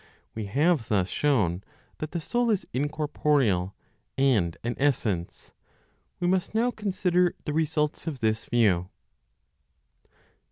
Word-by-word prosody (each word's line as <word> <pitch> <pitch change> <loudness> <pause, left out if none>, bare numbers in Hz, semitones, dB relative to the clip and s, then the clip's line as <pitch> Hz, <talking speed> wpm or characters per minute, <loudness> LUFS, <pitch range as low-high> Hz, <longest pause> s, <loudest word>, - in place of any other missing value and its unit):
We 110 -2 -5
have 145 - +2
thus 95 -4 +1
shown 100 - +1 0.4
that 155 - -4
the 170 - -3
soul 240 +9 0
is 210 -4 +1
incorporeal, 140 - 0 0.4
and 115 -12 +2
an 120 +1 -1
essence; 110 -11 -1 0.7
we 175 - -1
must 185 +3 0
now 240 +2 +2
consider 180 -5 +1
the 150 - -2
results 155 0 0
of 145 -5 -3
this 110 -1 0
view. 95 -7 +2
145 Hz, 120 wpm, -27 LUFS, 105-170 Hz, 0.7 s, have